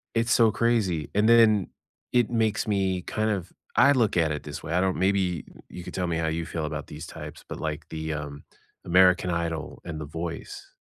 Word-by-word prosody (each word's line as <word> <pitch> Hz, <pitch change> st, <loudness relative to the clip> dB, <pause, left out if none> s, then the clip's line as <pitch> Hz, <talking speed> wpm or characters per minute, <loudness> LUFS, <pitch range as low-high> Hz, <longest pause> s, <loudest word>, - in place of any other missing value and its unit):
It's 115 Hz, +1 st, +1 dB
so 115 Hz, -2 st, +5 dB
crazy, 100 Hz, -11 st, +1 dB
and 105 Hz, +3 st, +3 dB
then 110 Hz, -4 st, +6 dB, 0.4 s
it 120 Hz, -2 st, +3 dB
makes 110 Hz, -2 st, 0 dB
me 95 Hz, -3 st, 0 dB
kind 110 Hz, 0 st, -1 dB
of 95 Hz, -4 st, -2 dB, 0.2 s
I 140 Hz, -, +6 dB
look 115 Hz, -9 st, +2 dB
at 80 Hz, -2 st, +3 dB
it 75 Hz, -1 st, -4 dB
this 75 Hz, -1 st, -7 dB
way; 85 Hz, -, -4 dB
I 90 Hz, -, +3 dB
don't 95 Hz, -1 st, +1 dB
maybe 95 Hz, -4 st, +1 dB, 0.2 s
you 90 Hz, -, -8 dB
could -, -, -8 dB
tell 90 Hz, -2 st, -1 dB
me 85 Hz, -1 st, -1 dB
how 80 Hz, -1 st, 0 dB
you 80 Hz, +1 st, -2 dB
feel 80 Hz, -3 st, -3 dB
about 75 Hz, -1 st, -5 dB
these 75 Hz, +1 st, -8 dB
types, -, -, -9 dB
but, -, -, -7 dB
like, -, -, -4 dB
the, 80 Hz, 0 st, -4 dB
um, 75 Hz, -1 st, -6 dB, 0.4 s
American 90 Hz, 0 st, +4 dB
Idol 85 Hz, -2 st, -3 dB
and 80 Hz, -2 st, -5 dB
The -, -, -4 dB
Voice. 80 Hz, +2 st, -7 dB
90 Hz, 210 wpm, -26 LUFS, 80-105 Hz, 0.4 s, then